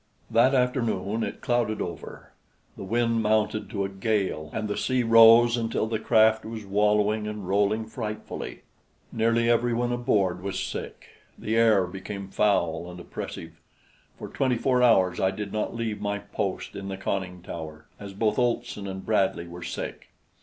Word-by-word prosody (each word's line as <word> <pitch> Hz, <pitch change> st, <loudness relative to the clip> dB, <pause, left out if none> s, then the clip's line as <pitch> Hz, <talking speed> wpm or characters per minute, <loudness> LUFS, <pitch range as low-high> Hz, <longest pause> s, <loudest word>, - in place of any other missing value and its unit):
That 120 Hz, +4 st, +4 dB
afternoon 115 Hz, -5 st, 0 dB
it -, -, -5 dB
clouded 120 Hz, -3 st, 0 dB
over; 85 Hz, -3 st, -7 dB, 0.4 s
the -, -, -8 dB
wind 115 Hz, +2 st, +1 dB
mounted 110 Hz, 0 st, 0 dB
to 100 Hz, -2 st, -2 dB
a -, -, -4 dB
gale, 95 Hz, -6 st, -1 dB
and 110 Hz, -1 st, -3 dB
the 105 Hz, -, -2 dB
sea 130 Hz, -1 st, 0 dB
rose 115 Hz, +1 st, +7 dB
until 115 Hz, -1 st, -1 dB
the 110 Hz, -1 st, -2 dB
craft 110 Hz, -1 st, +4 dB
was 110 Hz, -1 st, -7 dB
wallowing 105 Hz, +1 st, +1 dB
and 105 Hz, -3 st, -6 dB
rolling 105 Hz, +3 st, +1 dB
frightfully. 110 Hz, -1 st, -6 dB, 0.5 s
Nearly 115 Hz, +1 st, +1 dB
everyone 120 Hz, +1 st, +1 dB
aboard 100 Hz, -7 st, +1 dB
was 95 Hz, -1 st, -3 dB
sick; 95 Hz, -, -6 dB, 0.3 s
the 110 Hz, -, -2 dB
air 110 Hz, -5 st, +4 dB
became 95 Hz, +2 st, -7 dB
foul 90 Hz, -5 st, +1 dB
and 90 Hz, 0 st, -9 dB
oppressive. 90 Hz, -, -8 dB, 0.6 s
For -, -, -7 dB
twenty 130 Hz, -3 st, 0 dB
four 125 Hz, +1 st, +2 dB
hours 95 Hz, -7 st, +4 dB
I 95 Hz, -, +3 dB
did 100 Hz, +1 st, -6 dB
not 110 Hz, +2 st, -2 dB
leave 115 Hz, -2 st, -3 dB
my 100 Hz, 0 st, -1 dB
post 100 Hz, -1 st, -4 dB
in 100 Hz, 0 st, -6 dB
the 95 Hz, -1 st, -5 dB
conning 95 Hz, -2 st, -3 dB
tower, 80 Hz, -3 st, -8 dB
as 100 Hz, -1 st, -8 dB
both 110 Hz, +4 st, +1 dB
Olson 120 Hz, -4 st, -1 dB
and 95 Hz, 0 st, -6 dB
Bradley 95 Hz, -5 st, +1 dB
were 85 Hz, +1 st, -9 dB
sick. 85 Hz, -, -6 dB
105 Hz, 160 wpm, -26 LUFS, 95-115 Hz, 0.6 s, rose